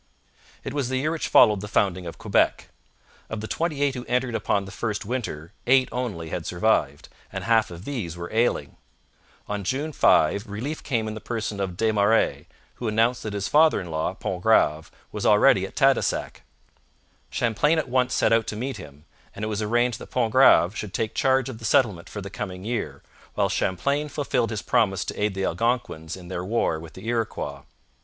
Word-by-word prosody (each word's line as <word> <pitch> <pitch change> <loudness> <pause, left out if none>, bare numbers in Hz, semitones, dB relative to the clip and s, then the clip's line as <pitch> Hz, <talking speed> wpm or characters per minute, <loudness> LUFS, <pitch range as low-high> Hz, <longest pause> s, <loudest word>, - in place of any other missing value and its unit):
It 135 - -5
was 140 -4 -1
the 130 - 0
year 150 +4 0
which 165 - -2
followed 105 -4 +5
the 105 - -6
founding 95 -3 0
of 85 - -7
Quebec. - - +1 0.6
Of 110 - -4
the 110 - -5
twenty 155 -1 -1
eight 140 -1 +2
who 125 -2 -5
entered 125 0 0
upon 100 -2 0
the 95 - -9
first 105 -1 -3
winter 100 -10 -4 0.2
eight 130 0 +4
only 105 -10 -4
had - - -4
survived, 85 -7 0 0.2
and - - -5
half 115 -1 +3
of 85 +2 -10
these 105 - -4
were 85 +3 -7
ailing. 110 - 0 0.7
On 105 -1 -3
June 140 - -2
5 100 - +3
relief 120 +10 -5
came 115 -6 -1
in 110 - -4
the 110 - -7
person 110 -3 -4
of 95 -3 -3
Des 110 +1 +2
Marais, 105 +2 +2 0.3
who 120 - -4
announced 115 +3 +2
that 110 - -5
his 100 -1 -2
father 155 +1 +4
in 90 -4 -7
law, 80 0 -2
Pontgrave, 75 +1 +1 0.2
was - - -5
already - - +5
at - - -16
Tadoussac. - - +1 0.9
Champlain 120 +8 +1
at 160 - -1
once 125 0 +1
set - - +3
out 115 -1 +2
to - - -3
meet 130 +5 -4
him, 75 +1 -12 0.3
and 105 - -4
it - - -3
was 105 0 -2
arranged 120 +2 +1
that - - -10
Pontgrave 115 -5 +4
should 105 -2 -5
take 110 -1 -1
charge 130 -1 +2
of 125 -4 -7
the - - -13
settlement 105 -6 +2
for 105 - -6
the 100 0 -8
coming 95 -2 -6
year, 105 - -3 0.3
while - - +1
Champlain 140 +11 0
fulfilled 135 -5 -1
his 105 -2 -4
promise 110 -6 +1
to - - -5
aid 105 -2 0
the 95 0 -1
Algonquins 115 -9 -1
in 90 -1 -11
their 90 0 -4
war 95 -5 0
with 80 -1 -11
the 95 - -10
Iroquois. 115 -2 -2
110 Hz, 195 wpm, -25 LUFS, 95-125 Hz, 0.9 s, followed